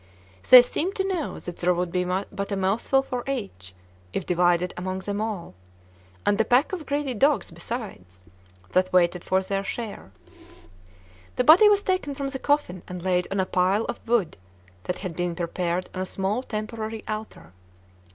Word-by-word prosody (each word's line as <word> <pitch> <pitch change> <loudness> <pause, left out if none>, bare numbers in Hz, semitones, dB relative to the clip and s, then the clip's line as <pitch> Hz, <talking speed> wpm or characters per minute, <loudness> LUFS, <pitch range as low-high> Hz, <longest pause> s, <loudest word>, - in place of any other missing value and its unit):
They 250 -1 +11
seemed 345 +9 -2
to 385 0 -1
know 360 -6 -2
that 175 - -7
there 180 0 +2
would 175 0 -2
be 180 +1 0
but 195 +2 -3
a - - 0
mouthful 210 +8 +1
for 250 -2 -4
each, 145 - -5 0.4
if 185 - -2
divided 175 0 +2
among 185 +1 -4
them 205 +1 -3
all, 210 - -4 0.7
and 205 0 +2
the - - +5
pack 250 - +2
of 325 -6 -5
greedy 285 -2 -1
dogs 280 +5 +2
besides, 95 - -7 0.5
that 185 0 +2
waited 180 -1 +3
for 190 0 +1
their 195 +1 -2
share. 210 - -6 1.2
The 250 - +2
body 345 - +8
was 410 -1 +3
taken 370 -7 -1
from 275 -1 -3
the 265 -1 -5
coffin 285 - 0
and 180 -1 -7
laid 180 -1 +1
on 195 - -2
a 190 - +2
pile 185 +4 +1
of - - -4
wood 225 -8 +1 0.5
that 180 - -2
had 185 -4 -6
been 175 0 -2
prepared 175 +1 -2
on 185 - -4
a 185 - -3
small 195 +6 -1
temporary 220 -1 -5
altar. 215 - -6
200 Hz, 175 wpm, -25 LUFS, 180-250 Hz, 1.2 s, They